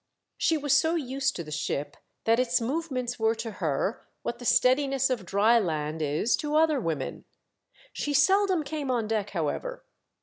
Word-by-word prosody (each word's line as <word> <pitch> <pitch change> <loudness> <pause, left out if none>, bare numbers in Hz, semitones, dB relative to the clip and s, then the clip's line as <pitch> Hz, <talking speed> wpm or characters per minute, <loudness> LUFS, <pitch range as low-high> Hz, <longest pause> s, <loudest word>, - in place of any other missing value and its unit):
She 325 - +2
was 290 -2 +1
so 320 +4 +3
used 275 -2 -1
to 170 - -4
the 155 - -10
ship 150 -1 -3 0.3
that 230 +1 +3
its 255 -1 +2
movements 255 -2 -3
were 220 +1 +2
to 225 0 -5
her 165 - -1 0.2
what - - -4
the 245 - -9
steadiness 265 +1 +3
of 225 -8 -2
dry 215 +5 +4
land 155 -4 -2
is 155 +10 +1
to 300 0 -2
other 310 -2 +4
women. 165 - -3 0.7
She 290 -1 -2
seldom 380 +3 +3
came 295 -2 -4
on 235 -4 0
deck 210 -2 -1
however. 200 - -3
250 Hz, 170 wpm, -27 LUFS, 200-290 Hz, 0.7 s, dry